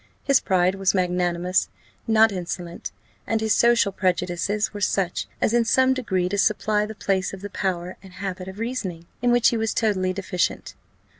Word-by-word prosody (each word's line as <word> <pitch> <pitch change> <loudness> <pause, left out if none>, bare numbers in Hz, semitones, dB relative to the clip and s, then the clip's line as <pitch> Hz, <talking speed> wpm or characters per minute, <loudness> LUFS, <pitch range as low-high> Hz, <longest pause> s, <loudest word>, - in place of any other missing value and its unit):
His 275 -1 +4
pride 185 -1 +2
was 195 0 +1
magnanimous, 180 0 +1 0.4
not 220 0 +5
insolent; 175 -2 -5 0.4
and 225 - +1
his 220 -1 +2
social 235 -3 +4
prejudices 185 +2 -1
were 205 - -6
such 190 -2 0
as, 220 - +1
in 240 0 +4
some 260 +3 +3
degree, 190 -8 -1
to 200 +2 -2
supply 210 0 +1
the 220 - -8
place 195 -1 -1
of 190 - -13
the 205 0 -7
power 180 -2 -3
and 190 -1 -14
habit 185 -1 -5
of 190 +1 -8
reasoning, 210 -8 -4 0.2
in 245 - +2
which 240 -1 +5
he 235 - -1
was 220 0 -1
totally 190 -5 +1
deficient. 185 -2 -2
195 Hz, 175 wpm, -24 LUFS, 180-220 Hz, 0.4 s, not